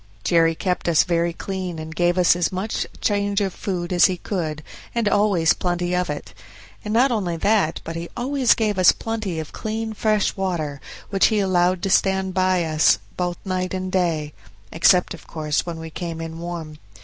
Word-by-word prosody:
Jerry 165 -1 +3
kept 180 0 -1
us 160 -3 +5
very 170 -1 0
clean, 185 0 -5
and 160 0 -7
gave 175 0 +2
us 180 -1 +5
as 175 -1 0
much 190 +4 -2
change 205 -1 +1
of 195 -3 -1
food 180 -2 -3
as 175 - +6
he 185 -2 +1
could, 155 -6 -4 0.3
and 230 -2 +1
always 200 -6 +3
plenty 175 0 -1
of 180 -2 0
it; 150 - -6 0.5
and 210 - -4
not 250 +4 +4
only 185 -7 -1
that, 200 -3 +1
but 165 - -6
he 170 +1 -5
always 260 0 +2
gave 210 -4 0
us 180 -5 +7
plenty 215 -6 -4
of 155 - -7
clean 220 0 -4
fresh 215 -1 +1
water, 165 -7 -3 0.3
which 195 -1 +4
he 220 - +1
allowed 185 -2 +2
to 195 - 0
stand 190 0 +2
by 185 -1 +2
us 155 -1 +3 0.2
both 175 -1 -2
night 185 0 -2
and 185 0 -4
day, 165 -5 0 0.4
except 180 +2 +4
of 175 - -12
course 155 0 -2
when 170 -1 -4
we 160 0 -8
came 165 -1 -5
in 165 0 -6
warm. 165 -3 -6
180 Hz, 190 wpm, -22 LUFS, 165-195 Hz, 0.5 s, us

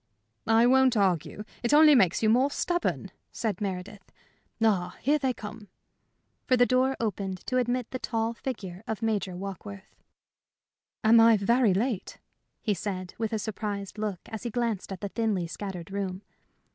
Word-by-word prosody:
"I 225 +1 +5
won't 260 -1 +4
argue. 190 0 0 0.2
It 240 +5 +3
only 305 0 +8
makes 195 -6 +3
you 215 - +4
more 255 +4 +4
stubborn," 350 +4 -1 0.2
said 215 -5 -3
Meredith. 195 0 -5 0.5
"Ah, 210 -6 +1
still 295 +4 +3
they 265 -2 +1
come!" 215 -2 -9 0.8
For 255 - +4
the 245 - +6
door 255 +2 +2
opened 195 -4 -3
to 255 - 0
admit 245 -1 -1
the 255 - -4
tall 225 -1 -1
figure 200 -7 -6
of 220 0 -4
Major 205 -5 -1
Warkworth. 195 +1 -8 1.1
"Am 225 +1 +7
I 225 -1 +7
very 220 0 +3
late?" 220 -1 -2 0.5
he 210 - +1
said, 185 -1 -5
with 225 -2 -1
a 220 - 0
surprised 205 -1 -4
look 210 -4 -3
as 220 - -7
he 240 - -3
glanced 230 -4 -2
at 190 - -6
the 200 - -3
thinly 210 -5 -1
scattered 180 +1 -7
room. 195 -1 -4
215 Hz, 160 wpm, -28 LUFS, 195-240 Hz, 1.1 s, only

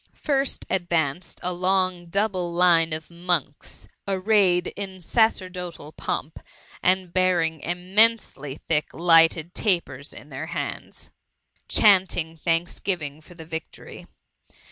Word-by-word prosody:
v - - -30
First 275 -2 -1
advanced 175 -3 -1
a 180 - -1
long 185 -1 0
double 185 -1 -1
line 170 -2 +4
of 155 0 -5
monkfS 170 -4 -3 0.2
arrayed 190 -2 +3
in 190 -2 -6
sacerdotal 180 -6 -1
pomp, 155 0 -4 0.4
and 185 -1 +1
bearing 175 -3 +2
im 180 +4 -6
nfensely 210 -11 +2
thick 155 -2 -1
lighted 165 0 +4
tapers 150 - -1
in 150 - -11
their 140 +3 -6
hands. 170 - -6 0.6
THE - - +1
MUMMT. - - +1 0.3
Sffi 160 -1 -4
dianting - - -33
tbanksgiyiBg 165 -2 -1
for 175 - -15
the 165 -1 -10
victory. 160 0 -8
175 Hz, 125 wpm, -24 LUFS, 160-185 Hz, 0.6 s, line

